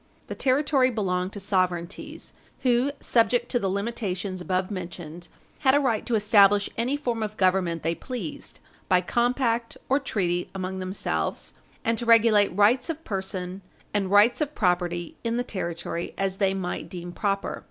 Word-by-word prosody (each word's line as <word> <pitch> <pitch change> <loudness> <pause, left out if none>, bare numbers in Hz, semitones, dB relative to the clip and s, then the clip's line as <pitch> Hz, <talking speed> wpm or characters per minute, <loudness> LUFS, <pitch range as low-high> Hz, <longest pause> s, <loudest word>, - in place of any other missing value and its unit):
The - - -3
territory 270 0 +2
belonged 185 -5 -1
to 205 - -6
sovereignties 185 -2 -2 0.3
who, 250 +2 +2
subject 240 +1 +2
to 245 - +1
the 195 - -1
limitations 200 -2 -3
above 185 +1 -1
mentioned, 175 -3 -6 0.3
had 265 0 +4
a - - +5
right 245 -6 +1
to 240 - +1
establish 205 -1 +5
any 250 +5 0
form 240 -6 -2
of 215 0 -4
government 185 -3 +1
they 165 +1 +1
pleased 225 - -7 0.3
by 185 -1 +5
compact 235 +3 0
or 270 +2 +4
treaty 180 -9 -1
among 190 0 -3
themselves, 185 - -3 0.3
and 230 0 +1
to 240 - -4
regulate 225 -3 +6
rights 220 - +3
of 325 0 -4
person 190 - -4 0.3
and 200 -2 0
rights 205 +8 +5
of 300 0 -2
property 175 -3 0
in 230 0 -1
the 245 - 0
territory 170 -5 -4
as 195 -1 -1
they 195 -1 +2
might 180 -2 -4
deem 175 -1 -7
proper. 195 +1 -2
200 Hz, 160 wpm, -26 LUFS, 185-235 Hz, 0.3 s, regulate